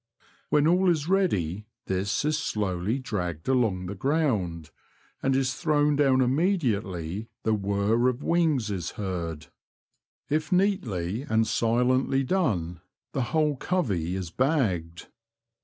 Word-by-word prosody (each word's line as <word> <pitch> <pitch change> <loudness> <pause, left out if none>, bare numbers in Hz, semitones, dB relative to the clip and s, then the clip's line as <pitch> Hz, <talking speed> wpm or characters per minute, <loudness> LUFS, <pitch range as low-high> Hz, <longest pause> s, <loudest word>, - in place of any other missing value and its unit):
When 150 0 +3
all 180 +3 +4
is 155 -3 +1
ready 105 - 0 0.2
this 100 +7 -1
is 155 0 +2
slowly 105 - -1
dragged 90 - -4
along 110 -9 +1
the 90 - -4
ground, 100 - -1 0.5
and 135 0 +1
is 135 -1 +1
thrown 150 -1 +2
down 135 -2 +3
immediately 115 - 0 0.2
the 110 - +2
whirr 100 +4 +1
of 125 +2 -4
wings 155 -10 +1
is 90 -4 -3
heard. 85 -6 -4 0.8
If 155 +1 -1
neatly 120 - 0
and 110 -5 +1
silently 125 +4 +1
done, 100 - -1 0.3
the 130 - -1
whole 155 -2 +2
covey 100 - -1
is 90 -3 -4
bagged. 95 - 0
115 Hz, 125 wpm, -27 LUFS, 95-150 Hz, 0.8 s, all